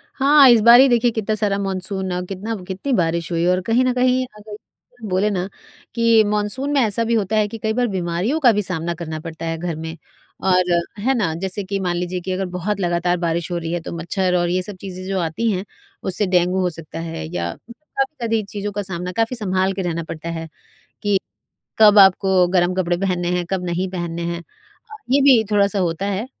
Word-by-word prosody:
हाँ, 280 -1 +6
इस 235 -2 +7
बार 235 +2 +8
ही 270 - +7
देखिए 240 0 +3
कितना 220 -1 -1
सारा 205 -2 0
मानसून 190 0 -3
अ, 180 - -2
कितना 205 +4 -4
कितनी 195 +9 -4
बारिश 170 -3 0
हुई 170 0 0
और 180 +1 +2
कहीं 235 +3 +3
न 255 - +2
कहीं 255 0 +2
अगर 210 0 -10 0.5
बोले 190 +3 +1
ना, 185 -2 -2 0.5
कि 230 -1 +5
मानसून 210 +7 -1
में 285 - +3
ऐसा 230 +1 +1
भी 230 - 0
होता 215 -1 0
है 215 -1 +2
कि 225 - -7
कई 220 0 -2
बार 245 +1 +1
बीमारियों 185 - -1
का 255 -6 +6
भी 210 -1 0
सामना 170 -3 -2
करना 160 -2 -6
पड़ता 165 0 -7
है 165 0 -2
घर 170 0 -3
में। 160 +1 -7 0.5
और 180 -1 +2 0.3
है 260 +6 +1
ना, 190 -11 0
जैसे 190 +3 -3
कि 195 +1 -3
मान 180 -2 -1
लीजिए 180 +1 -3
कि 185 - -4
अगर 190 +1 -1
बहुत 200 +3 -2
लगातार 175 -1 0
बारिश 170 0 -2
हो 175 - -1
रही 165 -1 -4
है, 175 - -1
तो - - -7
मच्छर 180 +2 -1
और 175 0 0
ये 185 +1 +1
सब 200 +2 -6
चीज़ें 185 -2 -7
जो 195 -1 -1
आती 170 +7 -1
हैं, 190 0 -3 0.4
उससे 190 +2 -1
डेंगू 180 +1 +2
हो 180 - +1
सकता 165 -1 -8
है 160 - -5
या 85 0 -2
काफ़ी 270 +3 -5
ज़्यादी 225 -3 -1
चीज़ों 205 0 -5
का 205 +1 -3
सामना 180 -1 -3
काफ़ी 225 +2 +1
सँभाल 190 -3 0
के 190 - -3
रहना 170 -2 -2
पड़ता 160 +1 -7
है 165 -1 -5 0.5
कि, 205 -2 +2 0.6
कब 215 -1 +7
आपको 190 -1 +5
गर्म 180 0 +3
कपड़े 175 -2 0
पहनने 180 -2 -1
हैं, 180 - -1
कब 190 -2 -1
नहीं 180 +2 -2
पहनने 170 -2 -4
हैं। 170 - -5
अ, 435 - -19 0.2
ये 275 +2 +4
भी 265 -5 +6
थोड़ा-सा 200 -1 +2
होता 180 +1 -1
है 200 +3 -2
190 Hz, 220 wpm, -20 LUFS, 175-215 Hz, 0.6 s, बार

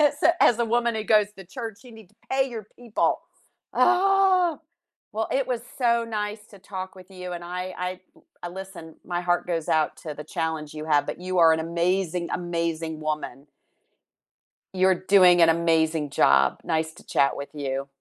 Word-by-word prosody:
s 295 -1 +2 0.2
as 235 - +6
the 235 - +1
woman 235 0 +1
who 220 0 -3
goes 210 -1 +3
to 190 - -10
church, 225 +1 -7
you 245 - -13
need 220 -4 -14
to 210 - -30 0.2
pay 265 0 +2
your 220 -4 -7
people. 235 -3 0 0.5
Ah! 370 -2 +3 0.5
Well, 220 +1 -2
it 270 0 +1
was 240 -2 -2 0.2
so 235 -2 +2
nice 210 -1 -4
to 200 - -14
talk 190 0 -7
with 185 +1 -14
you, 180 -1 -7
and 175 0 -6
I 180 +1 -5
I 180 0 -4 0.4
l 175 0 -6
listen, 190 -4 -9
my 175 -1 -2
heart 175 0 0
goes 165 -3 -2
out 155 -1 +1
to 155 -4 -7
the 150 +1 -8
challenge 155 -1 -3
you 155 +1 -6
have, 145 -2 +3
but - - -5
you 185 0 -2
are 165 -1 +7
an 160 - +1
amazing, 170 +1 -1
amazing 165 -2 -2
woman. 150 -3 -4 1.3
You're 185 0 +4
doing 185 -2 +5
an 165 - +7
amazing 160 -2 +2
job, 70 - +4
nice 160 0 -1
to - - -16
chat 140 - +2
with 140 - -6
you. 135 -1 -3
180 Hz, 185 wpm, -25 LUFS, 160-220 Hz, 1.3 s, are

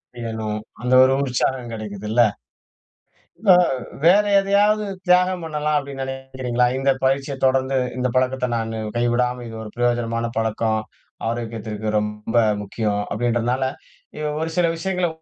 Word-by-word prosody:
செய்யணும். 110 -2 -4 0.2
அந்த 125 +1 0
ஒரு 130 +1 +4
உற்சாகம் 125 -2 -1
கிடைக்கிதுல்ல. 105 +1 -1 1.3
வே 190 - +9 0.5
வேற 195 +5 +6 0.2
எதையாவது 205 +2 +2 0.2
தியாகம் 180 0 +3
பண்ணலாம் 150 -1 -1
அப்பிடின்னு 140 -1 -4
நினைக்கிறீங்களா? 130 -2 -1
இந்த 135 0 +3
பயிற்சிய 135 +1 0
தொடர்ந்து, 130 0 +2 0.2
இந்த 125 0 +1
பழக்கத்த 130 0 +1
நானு 115 0 -3 0.2
கைவிடாம 125 +1 +1
இது 115 - -8
ஒரு 105 - -9
பிரயோஜனமான 120 -1 0
பழக்கம். 110 0 0 0.5
ஆரோக்கியத்திற்கு 110 -2 -4
ரொம்ப 105 +2 -4 0.3
முக்கியம், 105 0 -2
அப்பிடின்றதனால, 120 +3 0 0.6
வ் 150 0 -1
ஒரு 160 +1 -2
சில 175 - +4
விஷயங்கள 180 +1 -1
125 Hz, 120 wpm, -22 LUFS, 115-140 Hz, 1.3 s, வே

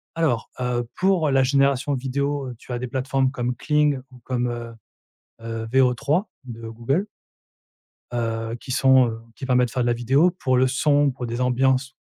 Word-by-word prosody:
Alors, 155 -9 0
heu, 120 -1 -1
pour 185 -6 +2
la 135 0 +4
génération 140 +1 +2
vidéo, 135 +1 -2
tu - - -17
as 120 - -2
des 125 - -4
plateformes 130 +1 0
comme 125 -1 -3
Kling 150 0 +2
ou 125 - -15
comme, 125 -1 -1
heu, 120 -1 -6 0.7
heu, 115 0 -5
VO3 135 - +2 0.2
de 115 -2 -8
Google 135 - -1 1.1
heu, 115 -1 -2
qui 130 - -6
sont, 130 -1 +5
heu, 115 0 -6
qui 135 - -6
permettent 125 -1 +3
de - - -12
faire 125 - 0
de 120 - 0
la 120 - +3
vidéo 135 +9 +3
pour 130 -7 0
le 130 +1 +4
son, 145 +2 +2
pour 125 -1 -6
des 120 +1 -4
ambiances. 130 +1 +1
130 Hz, 180 wpm, -23 LUFS, 120-140 Hz, 1.1 s, sont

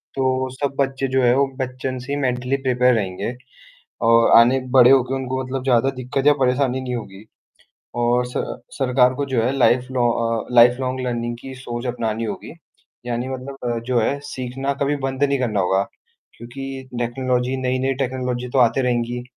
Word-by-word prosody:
तो 130 -1 0
सब 140 0 -2
बच्चे 135 0 0
जो 130 0 +1
है 120 - +5
वो 140 - +4 0.2
बचपन 130 0 -4
से 130 +3 -8
ही - - -1
मेंटली 125 0 0
प्रिपेयर 125 0 +3
रहेंगे 100 +2 -2 0.7
और 115 0 +5
आने 125 +3 +5 0.2
बड़े 125 0 +8
होके 130 -1 +3
उनको 130 0 -3
मतलब 130 0 -4
ज़्यादा 130 0 +3
दिक्कत 135 +2 -2
या 145 - +7
परेशानी 130 0 +1
नहीं 125 -1 -3
होगी। 100 -4 -8 0.8
और 120 +1 +2
स 125 - -11 0.4
सरकार 125 -1 +3
को 140 +2 -2
जो 120 - +3
है 125 - +1
लाइफ 125 -1 +3
लॉन्ग 120 -2 +2 0.4
अ, - - -7
लाइफ 120 +1 +7
लॉन्ग 130 0 -2
लर्निंग 120 -1 -2
की 135 0 -8
सोच 120 -1 -6
अपनानी 115 -2 -2
होगी। 110 - -6 0.5
यानी 120 +1 -2
मतलब 135 +1 -6 0.2
अ, - - -2
जो 120 +1 0
है 140 +6 0
सीखना 130 +2 -3
कभी 145 +1 +1
बंद 135 +1 -2
नहीं 140 -1 +1
करना 110 -5 0
होगा। 95 +1 +2 0.5
क्योंकि 120 +4 -9 0.4
टेक्नोलॉजी 125 +1 -1
नई-नई 130 +1 0
टेक्नोलॉजी 125 -1 -2
तो 135 - +3
आती 125 +2 +3
रहेंगी, 120 -1 -1
125 Hz, 180 wpm, -21 LUFS, 120-130 Hz, 0.8 s, बड़े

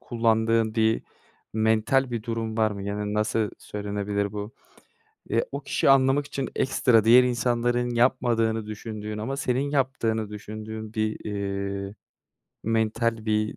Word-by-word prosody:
kullandığın 115 -1 +1
bir 110 0 +2 0.5
mental 110 +4 +2
bir 115 -2 -3
durum 115 -1 -3
var 110 -1 +3
mı? 100 -1 -6
Yani, 105 +1 -3
nasıl 105 0 0
söylenebilir 100 0 -3
bu? 105 +4 -6 0.8
Eee, - - +1
o - - -4
kişiyi - - +1
anlamak 135 +1 +4
için 140 -2 -4
ekstra 125 -4 +3
diğer 125 +3 +8
insanların 120 0 +1
yapmadığını 115 -2 +2
düşündüğün 105 0 -6
ama 135 +6 -3
senin 135 +1 0
yaptığını 115 -6 0
düşündüğün 110 +1 -7
bir, 110 -1 -1
eee, 100 -1 -3 0.7
mental 115 0 0
bir 105 0 0
110 Hz, 130 wpm, -26 LUFS, 105-120 Hz, 0.8 s, diğer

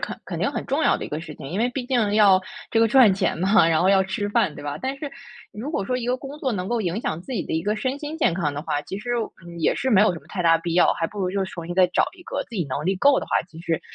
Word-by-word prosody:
肯 - - -5
肯 - - -5
定 - - 0
很 - - -4
重 - - 0
要 - - +4
的 - - -6
一 - - -6
个 150 +2 -4
事 155 -2 -9
情， 140 - -10
因 180 - -3
为 235 +3 +2
毕 255 0 -4
竟 235 -6 +1
要 200 -3 +6 0.3
这 225 - +2
个 225 - +4
赚 235 -3 +6
钱 190 0 0
嘛， 190 0 +4
然 160 -1 +2
后 185 - +3
要 195 -1 +5
吃 190 +2 -3
饭， 165 -6 +1
对 - - -9
吧？ 145 +1 -4
但 265 +1 -3
是 290 0 -5 0.4
如 235 +9 -6
果 200 - -1
说 250 +5 -1
一 245 -1 -4
个 250 - +1
工 275 +3 -9
作 265 -4 -1
能 185 -3 -3
够 240 -1 0
影 185 +1 -2
响 160 -7 -3
自 260 - -8
己 220 - -1
的 - - -5
一 160 - 0
个 210 +4 0
身 260 +5 -2
心 300 +2 -6
健 310 - +2
康 160 -5 -1
的 145 +1 -5
话， 145 -2 -1
其 190 +6 -6
实， 240 +4 -6 0.4
嗯， 170 0 -9
也 160 - +2
是 265 - -1
没 200 -5 +6
有 210 -2 +4
什 170 - -6
么 - - -23
太 185 -3 -3
大 165 -1 +5
必 165 0 -3
要， 175 - +5
还 165 - -2
不 205 +2 -7
如 180 - 0
就 195 0 -1
去 190 - -8
重 170 -2 -7
新 175 - -4
再 185 0 +5
找 180 - +2
一 - - -13
个。 - - -3
自 - - -34
己 175 - 0
能 140 +3 -3
力 190 +2 +1
够 275 +8 +4
的 - - -6
话， - - -18 0.2
其 160 -2 -12
实， 165 -2 -1
195 Hz, 365 characters per minute, -23 LUFS, 170-240 Hz, 0.4 s, 要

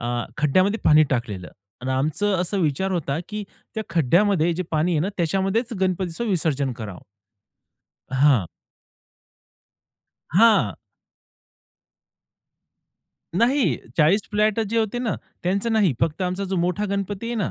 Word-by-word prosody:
आह, 120 0 -2
खड्ड्यामध्ये 185 +9 +2
पाणी 155 0 +7
टाकलेलं 105 -8 -2 0.3
आणि 130 +1 -3
आमचं 155 +10 0
असं 185 +3 -1
विचार 165 +4 0
होता, 160 -4 -1
की 210 0 -4 0.3
त्या 220 - -2
खड्ड्यामध्ये 170 +2 +3
जे 185 - -2
पाणी 160 +3 +1
आहे 155 - +1
ना 180 - 0
त्याच्यामध्येच 195 +8 0
गणपतीचं 185 +2 -1
विसर्जन 150 -8 0
करावं. 110 -6 -8 1.1
हां. 130 - +4 1.8
हां. 190 - +4 2.6
नाही. 250 +5 +2 0.2
40 165 +6 +4
फ्लॅट 210 +1 +2
जे 225 +1 0
होते 225 +2 -1
ना 235 -5 -1 0.3
त्यांचं 200 +6 0
नाही. 205 -8 +3
फक्त 165 +3 0
आमचा 185 +2 -2
जो 190 - -1
मोठा 180 +4 0
गणपती 200 +2 -3
आहे 235 - -2
ना, 205 - -1
180 Hz, 125 wpm, -23 LUFS, 150-205 Hz, 2.6 s, पाणी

